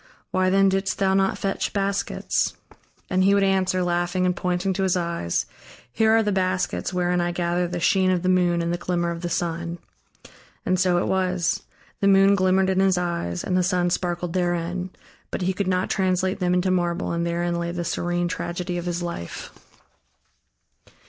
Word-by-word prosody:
Why 185 0 +2
then 195 +1 +4
didst 195 0 0
thou 190 -1 +2
not 195 0 +2
fetch 195 -1 -2
baskets?" 200 0 -1 0.5
And 185 0 +1
he 200 +1 +4
would 200 - +3
answer, 190 -1 +1
laughing 175 +1 0
and 180 -1 +1
pointing 180 +1 -1
to 195 - -2
his 185 -1 +2
eyes: 170 - -1 0.5
"Here 220 - +3
are 225 - +3
the 210 - 0
baskets 185 -2 -1
wherein 180 -1 +1
I 175 0 0
gather 175 0 0
the 175 0 -4
sheen 185 +2 +3
of 180 -1 +1
the - - 0
moon 175 -2 +2
and 170 +1 -1
the 175 - -3
glimmer 175 -1 -1
of 170 0 -6
the 175 - -3
sun." 170 0 -2 0.9
And 185 0 +1
so 180 -1 +3
it 175 - +1
was: 185 -2 0 0.4
the 200 - +2
moon 195 0 +6
glimmered 190 0 +3
in 190 - +1
his 190 -1 +3
eyes 170 - -2
and 180 - -1
the 185 - +3
sun 180 -1 +1
sparkled 175 -1 -2
therein. 175 0 -1 0.4
But - - -3
he 190 +1 +1
could 195 0 -2
not 185 0 +1
translate 185 0 0
them 180 -1 +1
into 180 +1 +1
marble 175 -2 0
and 170 0 -1
therein 170 0 -1
lay 170 0 -2
the 175 0 -4
serene 175 +1 -1
tragedy 175 +1 -3
of 175 - -6
his 175 0 -2
life. 170 - -6
180 Hz, 190 wpm, -24 LUFS, 175-190 Hz, 0.9 s, moon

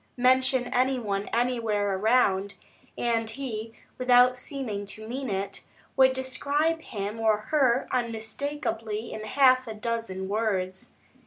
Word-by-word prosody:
Mention 255 0 +3
any 260 +1 +2
one 200 -4 -2
anywhere 225 -5 0
around, 200 -2 +2 0.4
and 230 -2 0
he, 225 -3 -5 0.3
without 250 0 +5
seeming 245 -6 -5
to 215 +2 -8
mean 260 +2 -4
it, 195 0 -3 0.3
would 260 0 +5
describe 285 +5 0
him 210 -4 -5
or 220 -1 +3
her 255 +2 +1
unmistakably 230 -1 -3
in 215 - -6
half 255 +1 +4
a 220 - -5
dozen 215 -4 -3
words. 195 -3 -2
230 Hz, 125 wpm, -27 LUFS, 210-255 Hz, 0.4 s, without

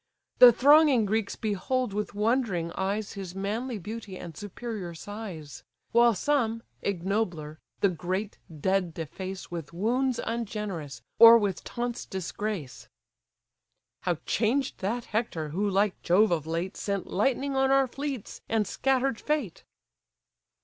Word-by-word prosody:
The 250 -1 +11
thronging 280 -1 +5
Greeks 215 0 -1
behold 220 +2 -1
with 210 0 -3
wondering 210 -6 0
eyes 200 +3 -2
His 190 -2 -7
manly 220 +5 -2
beauty 210 0 -7
and 170 -3 -9
superior 205 -2 -6
size; 185 -6 -8 0.3
While 235 -1 +5
some, 230 -1 0 0.2
ignobler, 175 -5 -2 0.2
the 200 - +5
great 185 +4 -3
dead 180 +2 0
deface 185 +5 -6
With 170 -3 -6
wounds 245 +7 0
ungenerous, 200 - -4 0.2
or 230 0 +11
with 200 -5 -1
taunts 240 0 -4
disgrace: 190 -4 -5 1.1
"How 175 -2 0
changed 250 +5 0
that 230 +5 -2
Hector, 210 -9 -2
who 200 +7 0
like 200 0 +1
Jove 195 +4 +4
of 160 -3 0
late 170 +3 -2
Sent 200 -2 -2
lightning 270 +6 0
on 265 0 +3
our 270 0 +5
fleets, 270 -2 -5
and 220 -2 +2
scatter'd 265 +2 0
fate!" 295 - -2
205 Hz, 130 wpm, -28 LUFS, 185-235 Hz, 1.1 s, The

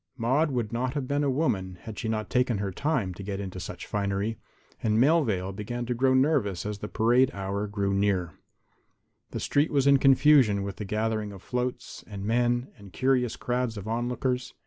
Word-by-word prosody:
Maude 135 +7 +2
would 120 -5 -2
not 125 +3 -1
have 140 -3 -2
been 145 +2 0
a 140 - +1
woman 95 - -1
had 110 -2 -7
she 115 - -3
not 110 -1 -2
taken 125 -3 +1
her 100 -1 -2
time 130 - -1
to 90 - -10
get 100 0 -4
into 95 -2 -5
such - - -7
finery, 100 +2 -2 0.4
and 110 -1 +1
Melvale 120 - +2
began 120 +5 -4
to 125 - -1
grow 130 +2 +2
nervous 130 - +1
as 105 -1 -4
the 105 - -5
parade 120 +5 +3
hour 100 +1 -3
grew 100 -1 -1
near. 95 -4 +1 1.0
The - - -5
street 145 +2 +1
was 140 -3 +2
in 140 0 +6
confusion 135 -6 +5
with 100 -1 -5
the 105 - -5
gathering 110 0 -1
of 95 -2 -11
floats 125 0 -4
and 100 -2 -6
men 120 +3 +1
and 100 -2 -13
curious 125 +1 +1
crowds 125 -2 -2
of 100 +1 -7
onlookers. 125 +3 -2
115 Hz, 190 wpm, -27 LUFS, 100-130 Hz, 1.0 s, in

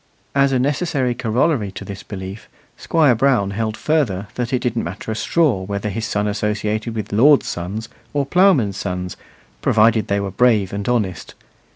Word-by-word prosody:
As 140 0 +3
a 130 - +2
necessary 135 -1 0
corollary 120 -1 0
to - - -8
this 100 -1 -7
belief, 95 +1 -8 0.3
Squire 155 -6 +3
Brown 120 -5 +2
held 110 +1 -2
further 110 -11 0
that 125 -1 -3
it 130 - +2
didn't 120 -2 -1
matter 95 +6 -5
a - - -2
straw 140 - +1
whether 100 +2 -3
his 110 +2 -3
son 105 0 -1
associated 105 +2 -2
with 105 -2 -4
lords' 140 +7 +5
sons 100 +6 -4 0.2
or 145 -1 0
ploughmen's 140 - +3
sons, 90 -1 -4 0.5
provided 110 -1 +3
they 100 0 +1
were 100 -1 -3
brave 105 -3 +2
and 100 +3 -3
honest. 105 -8 -2
110 Hz, 170 wpm, -20 LUFS, 100-130 Hz, 0.5 s, lords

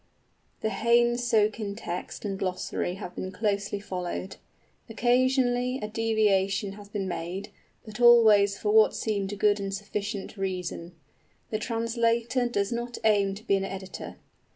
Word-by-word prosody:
The 220 - -1
Heyne 240 +1 +3
Socin 215 -3 +1
text 180 0 -6
and 195 -2 -3
glossary 185 -1 -2
have 190 -3 -7
been 185 - -4
closely 200 0 -1
followed. 185 -1 -5 0.5
Occasionally 250 +1 +2
a 210 - -4
deviation 210 -3 +1
has 200 0 -12
been 205 -2 -3
made, 180 +3 -4 0.4
but 215 +2 -8
always 215 -4 +6
for 210 - -1
what 220 0 +5
seemed 205 -2 -2
good 210 0 +3
and 195 -1 -3
sufficient 200 +1 -4
reason. 180 -2 -4 0.6
The 215 - -1
translator 230 +2 0
does 200 -2 -1
not 240 +1 -3
aim 200 -3 +3
to 210 - -11
be 200 - +2
an 195 - -1
editor. 195 -1 -7
210 Hz, 140 wpm, -27 LUFS, 195-230 Hz, 0.6 s, always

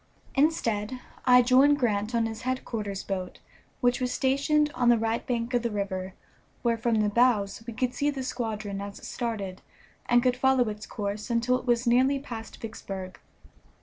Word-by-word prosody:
Instead, 255 -6 +1 0.3
I 250 0 +7
joined 265 +4 +5
Grant 220 -3 0
on 230 -1 +2
his 225 0 -5
headquarters 225 -6 -3
boat, 185 -2 -4 0.4
which 245 0 +2
was 250 -1 0
stationed 290 +3 +2
on 245 -1 +2
the 240 - +6
right 225 +1 -1
bank 240 -1 -2
of 245 - +3
the 235 - -1
river, 190 -3 -3 0.5
where 235 -1 +2
from 225 -1 +1
the 210 - +2
bows 225 -3 +2
we 235 - -5
could 250 +1 -1
see 285 +3 0
the 275 -2 -3
squadron 215 -5 -3
as 200 0 -7
it - - -11
started, 205 -6 -4 0.5
and 240 0 +4
could 250 -1 +3
follow 260 -2 +3
its 210 0 -7
course 210 +2 -4
until 235 +1 +2
it - - -13
was 240 0 +2
nearly 255 +4 +4
past 235 -5 -8
Vicksburg. 195 -4 -7
235 Hz, 180 wpm, -27 LUFS, 210-255 Hz, 0.5 s, I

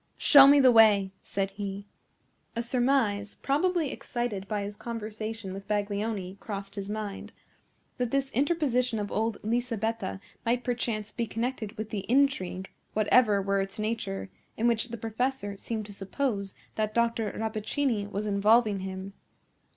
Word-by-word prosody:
"Show 275 -2 +8
me 285 +1 +7
the 260 -2 +7
way," 210 -4 +6
said 195 0 -2
he. 200 0 -5 0.7
A 235 - -1
surmise, 235 -5 +1
probably 320 +1 +1
excited 230 -6 -3
by 205 -1 -1
his 205 +1 -5
conversation 220 -2 -5
with 195 +1 -8
Baglioni, 205 -2 -2
crossed 200 -2 -6
his 200 -1 -5
mind, 210 -2 -5 0.7
that 245 -1 0
this 275 +1 0
interposition 255 -4 +1
of 205 -1 -3
old 220 0 0
Lisabetta 225 -3 -1 0.2
might 240 +2 +1
perchance 230 -4 -2
be 235 +1 -2
connected 230 -1 -3
with 215 0 -5
the 205 -1 -4
intrigue, 225 -9 +1 0.2
whatever 215 -1 +4
were 195 0 +1
its 195 +3 -4
nature, 215 -3 -3 0.3
in 230 - +2
which 235 0 +2
the 235 - -5
professor 225 -1 -2
seemed 215 +1 -4
to 205 - -8
suppose 200 0 -2 0.2
that 215 0 -2
Dr. 230 -3 +1
Rappaccini 220 0 -1
was 205 +1 -3
involving 210 +1 +3
him. 190 +1 -6
215 Hz, 145 wpm, -28 LUFS, 200-240 Hz, 0.7 s, Show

